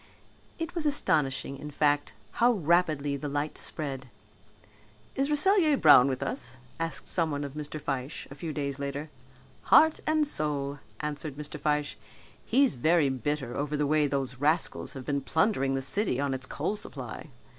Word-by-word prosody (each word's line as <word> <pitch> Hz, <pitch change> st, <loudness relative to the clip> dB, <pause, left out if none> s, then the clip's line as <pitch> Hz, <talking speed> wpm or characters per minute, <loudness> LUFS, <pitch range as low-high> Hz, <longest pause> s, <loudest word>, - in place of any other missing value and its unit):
It 330 Hz, +1 st, -4 dB
was 335 Hz, -4 st, -1 dB
astonishing 140 Hz, -, +1 dB
in 150 Hz, -, -7 dB
fact 145 Hz, 0 st, +1 dB, 0.3 s
how 240 Hz, +1 st, +6 dB
rapidly 155 Hz, -6 st, +1 dB
the 145 Hz, +1 st, -5 dB
light 145 Hz, +2 st, -2 dB
spread. 135 Hz, -4 st, -3 dB, 1.0 s
"Is 275 Hz, +2 st, 0 dB
Rasselyer 315 Hz, -1 st, +4 dB
Brown 145 Hz, -, +7 dB
with 130 Hz, -1 st, -2 dB
us?" 245 Hz, -, -4 dB, 0.2 s
asked 165 Hz, 0 st, -3 dB
someone 155 Hz, -4 st, 0 dB
of 140 Hz, -1 st, -6 dB
Mr. 150 Hz, 0 st, -6 dB
Fyshe 135 Hz, 0 st, -4 dB
a -, -, -6 dB
few 155 Hz, +3 st, -5 dB
days 140 Hz, -2 st, -3 dB
later. 140 Hz, +2 st, -4 dB, 0.5 s
"Heart 315 Hz, 0 st, +6 dB
and 310 Hz, -1 st, +3 dB
soul," 145 Hz, -, +2 dB, 0.2 s
answered 150 Hz, -1 st, -4 dB
Mr. 150 Hz, 0 st, -7 dB
Fyshe. 150 Hz, 0 st, -1 dB, 0.5 s
"He's 270 Hz, +3 st, +3 dB
very 155 Hz, +3 st, +3 dB
bitter 130 Hz, 0 st, -3 dB
over 150 Hz, +1 st, -2 dB
the 150 Hz, -, +1 dB
way 150 Hz, 0 st, +2 dB
these 135 Hz, -2 st, -3 dB
rascals 155 Hz, +4 st, 0 dB
have 135 Hz, -3 st, -8 dB
been 140 Hz, -1 st, -1 dB
plundering 135 Hz, -2 st, +1 dB
the 135 Hz, -, -2 dB
city 135 Hz, -, -1 dB
on 140 Hz, -1 st, 0 dB
its 130 Hz, 0 st, -4 dB
coal 170 Hz, +8 st, -2 dB
supply. 135 Hz, -, -6 dB
150 Hz, 160 wpm, -28 LUFS, 140-165 Hz, 1.0 s, Brown